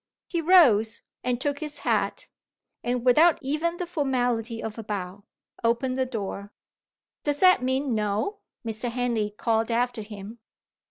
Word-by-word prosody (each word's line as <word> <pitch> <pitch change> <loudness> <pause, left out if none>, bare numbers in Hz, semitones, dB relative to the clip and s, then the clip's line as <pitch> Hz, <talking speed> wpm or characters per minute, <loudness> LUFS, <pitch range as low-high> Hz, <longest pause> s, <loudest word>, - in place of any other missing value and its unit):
He 340 -2 -2
rose, 270 - +5 0.2
and 245 -1 0
took 285 +1 -1
his 300 -2 -5
hat - - 0 0.6
and, 245 0 -1
without 310 +7 +6
even 310 +5 -1
the 360 - -3
formality 245 -8 -1
of 220 0 -5
a - - -5
bow, 200 -1 -5 0.4
opened 235 +3 +1
the 260 0 0
door. 205 -4 -5 0.7
"Does 290 -1 0
that 370 -6 +6
mean 260 +1 0
No?" 215 - -1 0.3
Mr. 225 +2 -2
Henley 235 -3 -1
called 225 +2 0
after 240 0 0
him. 210 +2 -9
245 Hz, 145 wpm, -26 LUFS, 220-285 Hz, 0.7 s, without